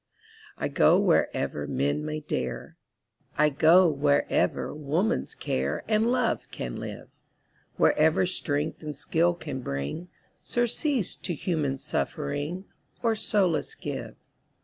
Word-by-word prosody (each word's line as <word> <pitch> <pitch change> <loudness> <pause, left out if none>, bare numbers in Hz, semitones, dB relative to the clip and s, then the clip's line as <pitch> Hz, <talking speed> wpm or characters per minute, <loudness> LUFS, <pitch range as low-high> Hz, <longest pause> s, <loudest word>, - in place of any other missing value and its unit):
I - - -1
go - - +4
wherever 75 0 +1
men 70 - 0
may 155 0 -3
dare, - - -4 0.6
I 150 0 +5
go 165 +5 +6
wherever 70 - +1
woman's 155 +8 -1
care 70 +3 -2
And 220 +2 +2
love 255 - 0
can - - -5
live, - - -7 0.7
Wherever 160 +4 +4
strength 155 -4 -2
and 150 -3 -6
skill 170 +4 +1
can 145 -6 -6
bring 70 - -4 0.3
Surcease 240 - 0
to 175 - -4
human 150 -5 -1
suffering, 145 - -3 0.4
Or 230 -1 +3
solace 205 - +1
give. - - -6
155 Hz, 115 wpm, -27 LUFS, 140-185 Hz, 0.7 s, go